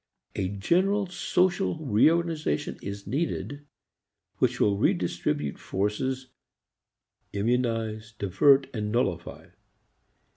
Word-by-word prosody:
A 95 - -1
general 185 - +1
social 180 0 +1
re 115 +3 +5
organization 165 - -1
is 100 0 -6
needed 145 -1 -3 0.7
which - - +1
will 100 -1 +3
redistribute 75 -6 0
forces, 130 +7 -2 1.0
immunize, 115 0 -1
divert 135 +9 +4
and 105 -3 -3
nullify. 95 -8 -2
115 Hz, 85 wpm, -27 LUFS, 100-150 Hz, 1.0 s, re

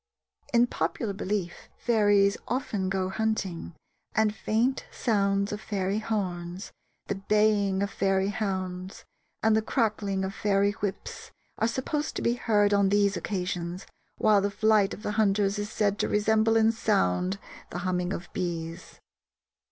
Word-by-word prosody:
In 240 0 +5
popular 225 -3 -2
belief 190 -2 -3
fairies 205 -4 +3
often 210 -7 -1
go 190 -1 0
hunting, 190 -5 -2 0.4
and 220 -1 +3
faint 225 +5 0
sounds 200 -3 +1
of 210 0 -4
fairy 200 0 -1
horns, 185 -4 -3 0.3
the - - -2
baying 200 -1 +2
of 200 - -2
fairy 195 0 +1
hounds, 190 -3 -4 0.4
and 220 -1 +4
the 220 - +3
cracking 210 -4 0
of 190 - -4
fairy 200 0 +2
whips 205 -1 -5 0.3
are 225 - +3
supposed 280 +5 -2
to - - -3
be 235 - +3
heard 210 -4 +2
on 200 -1 +4
these 200 0 +3
occasions, 180 -2 -3 0.3
while 210 -2 +4
the 200 - +1
flight 210 -1 +3
of 210 - -14
the 210 - -1
hunters 200 0 +2
is 205 0 -3
said 205 -2 0
to - - +1
resemble 220 +1 +2
in 225 0 +5
sound 195 - +1 0.3
the - - -5
humming 180 0 0
of 175 -2 -4
bees. 170 -2 -4
200 Hz, 145 wpm, -27 LUFS, 190-215 Hz, 0.4 s, In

